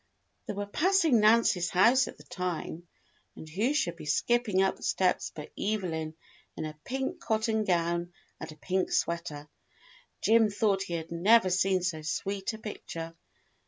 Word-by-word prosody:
They - - -3
were 205 0 -3
passing 325 - +3
Nancy's 215 -5 +4
house 235 +8 +4
at - - -9
the - - -15
time, 175 -1 -5 0.5
and 160 - -10
who 205 - 0
should 295 - 0
be - - -9
skipping 210 +4 +2
up 190 - +1
the - - -20
steps 185 -1 +1
but 150 -1 -8
Evelyn 165 -7 -2 0.4
in - - -3
a 155 0 -8
pink 270 +7 -3
cotton 220 -6 0
gown 170 -1 0 0.3
and - - -7
a - - -11
pink 185 +4 -1
sweater. 165 -3 -2 0.7
Jim 225 -1 +4
thought 200 -1 +1
he 175 -3 -3
had 165 0 -6
never 190 +3 +4
seen 185 0 +2
so 165 -4 -2
sweet 195 +6 -3
a - - -7
picture. 165 -6 -7
190 Hz, 160 wpm, -29 LUFS, 170-220 Hz, 0.7 s, Nancy's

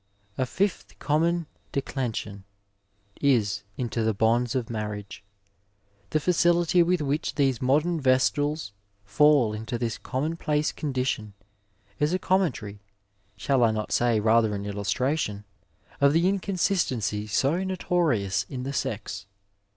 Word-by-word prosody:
'' 100 0 -38
A 130 - +1
fifth 195 +7 -2
common 165 +3 +1 0.3
declension 115 -7 -3 0.8
is 105 -7 +2 0.2
into 120 -2 -2
the 110 -1 +1
bonds 115 +3 +2
of 125 -3 -1
marriage. 105 -3 -5 0.9
The 155 - +1
facility 175 +1 +3
with 175 0 +2
which 145 +3 -1
these 135 -5 +1
modem 150 +6 +2
Vestals 140 0 +1 0.3
fall 130 +1 +4
into 110 +2 -4
this 115 -2 -3
commonplace 150 +2 -1
condition 125 -7 -3 0.6
is 150 +4 +2
a - - +2
conmientary, 155 - -1 0.6
shall 130 +4 +2
I 115 - +5
not 110 -1 -3
say 120 -2 +2
rather 110 0 +3
an 100 0 -5
illustration, 105 +2 -1 0.6
of 140 0 +5
the 170 +3 +3
inconsistency 175 - 0
so 140 - +1
notorious 170 - 0
in 125 -2 -5
the 135 +1 -4
sex. 100 -5 -4
130 Hz, 125 wpm, -26 LUFS, 110-155 Hz, 0.9 s, I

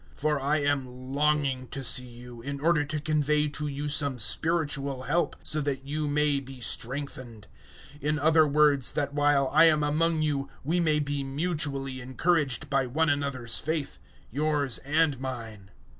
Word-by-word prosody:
001:011 - - -22
For 150 0 0
I 145 +3 +1
am 130 -2 -3
longing 140 -3 0
to 135 +1 -5
see 125 0 +1
you, 120 0 -12
in 140 +3 -5
order 155 0 +2
to 150 +1 -3
convey 150 0 +1
to 150 +1 -4
you 145 +1 -4
some 145 -3 0
spiritual 140 +2 +1
help, 170 +6 0
so 155 - +1
that 135 -2 -3
you 150 +2 -2
may 145 -1 +2
be 135 -1 -11
strengthened; 120 -3 -4 0.5
001:012 - - -25
in 150 +1 +2
other 155 +1 +4
words 145 -2 +3
that 145 -1 -2
while 145 -2 +2
I 160 +2 +7
am 155 -2 +4
among 155 +2 +1
you 140 -3 -1
we 165 +6 0
may 155 -3 +3
be 145 -1 -2
mutually 135 -3 -2
encouraged 140 +1 0
by 135 -2 0
one 160 +5 +1
another's 140 -5 0
faith, 150 - -3 0.3
yours 145 -1 0
and 150 -1 +1
mine. 115 -7 -7
145 Hz, 170 wpm, -27 LUFS, 135-150 Hz, 0.5 s, I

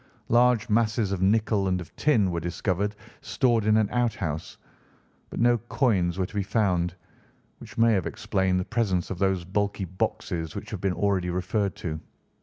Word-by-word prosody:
Large 120 -2 +4
masses 110 -1 +1
of 95 -2 -2
nickel 105 0 +2
and 90 -1 +1
of 90 - -10
tin 110 -11 +2
were 85 - -1
discovered 95 +4 -2 0.3
stored 120 -5 +1
in 110 0 +4
an 110 -2 +3
out 120 -3 +1
house, 80 -5 -4 0.7
but - - -6
no 120 0 +4
coins 100 - +1
were 95 - 0
to 90 - -11
be 105 - 0
found, 90 -4 0 0.6
which - - -12
may 115 0 +5
have 95 -5 0
explained 95 -1 0
the 90 - -2
presence 100 -7 0
of 90 - -4
those 95 -3 +1
bulky 100 +1 -1
boxes 85 -2 -3
which - - -7
have - - -5
been 95 -2 +1
already 95 -2 0
referred 95 +3 -1
to. 80 -2 -4
100 Hz, 180 wpm, -26 LUFS, 90-110 Hz, 0.7 s, may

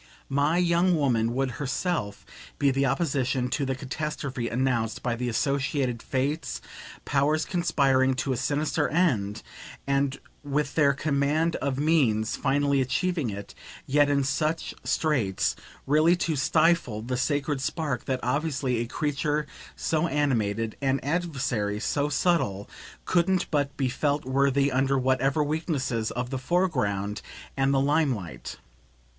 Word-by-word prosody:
My 145 +4 +2
young 175 +1 +3
woman 120 -7 +1
would 135 -1 0
HERSELF 135 - -2 0.3
be 140 -1 +3
the 135 +1 +1
opposition 130 -3 0
to 140 +2 -1
the 135 - -1
catastrophe 135 -2 -4
announced 120 -2 -1
by 120 -2 0
the 125 +1 -2
associated 135 -1 0
Fates, 140 +5 -2 0.5
powers 145 +3 +1
conspiring 135 -7 +2
to 130 +1 -1
a - - -3
sinister 150 +5 0
end 115 - +1 0.4
and, 140 0 0 0.2
with 145 0 -1
their 140 -3 +4
command 150 +3 +1
of 140 -2 -2
means, 135 -8 +2
finally 140 0 +1
achieving 150 +2 0
it, 100 0 -7 0.3
yet 145 +1 +3
in 140 -1 +2
such 155 +4 -1
straits 125 -12 0 0.3
really 155 +5 +4
to 170 -2 -1
STIFLE 135 -5 +2
the 125 +2 -2
sacred 145 +1 0
spark 140 -2 -2
that, 130 -1 -1
obviously, 135 -1 0
a 120 - -2
creature 150 +2 -1 0.3
so 160 +1 0
animated, 115 -7 0
an 135 0 +1
adversary 135 -10 -1
so 145 +5 0
subtle, 145 - +1 0.4
couldn't 185 +1 +1
but 145 -2 0
be 135 - +1
felt 145 +3 -1
worthy, 140 +1 +2
under 135 +1 +2
whatever 130 +3 +2
weaknesses, 145 -7 -1
of 125 +1 -4
the 130 - -2
foreground 125 - 0 0.3
and 135 0 +2
the 135 - +3
limelight. 140 - -1
140 Hz, 135 wpm, -26 LUFS, 125-150 Hz, 0.5 s, their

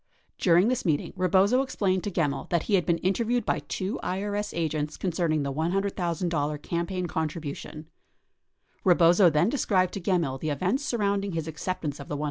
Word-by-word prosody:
During 175 +2 +4
this 255 0 0
meeting, 155 -4 0
Rebozo 190 +7 +3
explained 195 -8 0
to - - -1
Gemmill 160 -6 -1
that 170 -2 +1
he 210 - -3
had 185 -3 +3
been 170 -1 +3
interviewed 225 +6 0
by - - +1
two 195 +6 -4
IRS 205 +2 -2
agents 155 -2 -2
concerning 165 -4 0
the 140 -1 -2
$100,000 170 -3 -1
campaign 180 +2 -2
contribution. 155 -2 -5 1.0
Rebozo 175 0 +6
then 155 +3 +2
described 190 -9 +1
to 195 - -4
Gemmill 170 -8 0
the 155 - -2
events 185 - 0
surrounding 200 -6 0
his 165 -1 -3
acceptance 160 -2 -4
of 140 - -8
the 145 - -3
$100,000. - - -7
175 Hz, 165 wpm, -27 LUFS, 155-195 Hz, 1.0 s, Rebozo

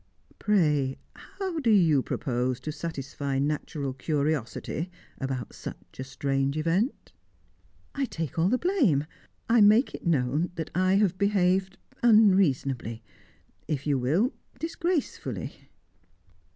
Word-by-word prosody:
Pray, 150 -10 +2 0.2
how 380 -4 -5
do 255 -6 +1
you 165 -10 +5
propose 125 -2 -2
to 155 - -4
satisfy 140 -3 -4
natural 145 0 -2
curiosity 150 +3 -2 0.3
about 135 -4 -4
such - - -10
a - - -2
strange 135 +1 -1
event?" 170 - 0 0.8
"I 280 -1 0
take 165 - -4
all 170 +3 +3
the 250 - +3
blame. 255 - +2 0.4
I 230 0 +5
make 215 +5 +5
it - - -8
known 150 +2 +1
that 160 -1 -5
I 185 +3 +3
have 195 -3 +2
behaved 190 -1 +2 0.2
unreasonably; 150 - +3 0.6
if 145 -3 -2
you 145 -3 +1
will 165 - +1 0.2
disgracefully." 325 - -2
160 Hz, 115 wpm, -27 LUFS, 135-205 Hz, 0.8 s, you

